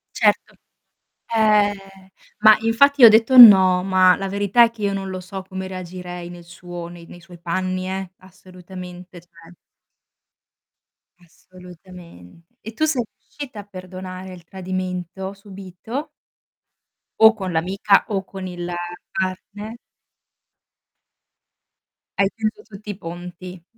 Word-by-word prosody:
Certo. - - +1 0.8
Ehm, 210 -2 +3 0.6
ma 215 0 +7
infatti 260 +4 +4
ho - - +13
detto: 225 +4 +4
"No", 190 -6 +9
ma 185 -1 +4
la 195 -1 -4
verità 205 +4 +3
è 230 - +1
che 230 -2 -12
io 200 -1 0
non 195 -1 -4
lo 185 0 -5
so 190 +1 -8
come 190 0 -7
reagirei 180 -1 -8
nel 175 0 -11
suo 170 0 -9
nei 170 -1 -13
nei 175 - -14
suoi 175 0 -15
panni, 185 +2 -3
eh, 190 -1 -5
assolutamente, 180 -1 -12
cioè. 165 0 -19 1.7
Assolutamente. 175 - -16
E 225 +1 -9
tu 310 - 0
sei 275 -6 0
riuscita 260 -7 -10
a - - -8
perdonare 185 -1 -9
il 175 -2 -13
tradimento 185 0 -5
subìto? 200 - -8 1.1
O 220 0 +8
con 190 -4 -5
l'amica 190 +5 +2
o 195 -2 -2
con 190 -1 -8
il 175 -1 -6 0.4
partner? 200 +4 -5 2.4
Hai 195 - +4
chiuso 220 -1 -3
tutti 210 0 -13
i 205 - -5
ponti. 175 0 -9
185 Hz, 125 wpm, -21 LUFS, 180-205 Hz, 2.4 s, ho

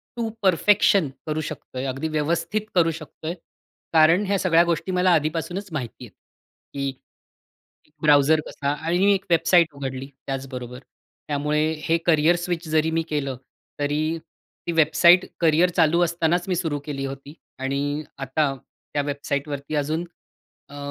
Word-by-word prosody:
To 230 -2 -2
perfection 195 -2 +4 0.2
करू 155 0 -1
शकतोय, 130 -3 -6
अगदी 135 +4 -2
व्यवस्थित 165 +6 -1
करू 165 -2 +4
शकतोय. 155 +1 -7 0.6
कारण 165 +5 +5
ह्या 200 0 +2
सगळ्या 170 -2 +4
गोष्टी 170 +2 -1
मला 180 0 +3
आधीपासूनचं 165 +4 -2
माहिती 130 -4 -5
आहेत. 110 - -15 0.6
की 140 -1 -2 1.1
...ब्राऊझर 150 +1 +5
कसा 140 0 -3
आणि 165 +4 -1
मी 200 +2 +5
एक 195 -1 -3
वेबसाईट 170 0 +4
उघडली 135 -1 -5 0.2
त्याचबरोबर. 130 -2 -5 0.5
त्यामुळे 150 +1 0 0.2
हे 165 - +2
करिअर 165 +1 +4
स्विच 175 -1 -3
जरी 155 0 +2
मी 165 0 0
केलं, 140 -3 -2 0.4
तरी 155 +3 0 0.5
ती 170 - -1
वेबसाईट 165 +3 +5 0.2
करिअर 165 +2 +4
चालू 165 0 +4
असतानाचं 170 +1 0
मी 185 - +1
सुरु 160 -4 -1
केली 140 -2 -4
होती. 135 +2 -8 0.2
आणि 140 +3 -2 0.2
आता 135 +2 0 0.4
त्या 145 - +1
वेबसाईटवरती 140 0 -3
अजून 155 +4 -1 0.6
अ, 145 - -11
155 Hz, 140 wpm, -23 LUFS, 145-170 Hz, 1.1 s, कारण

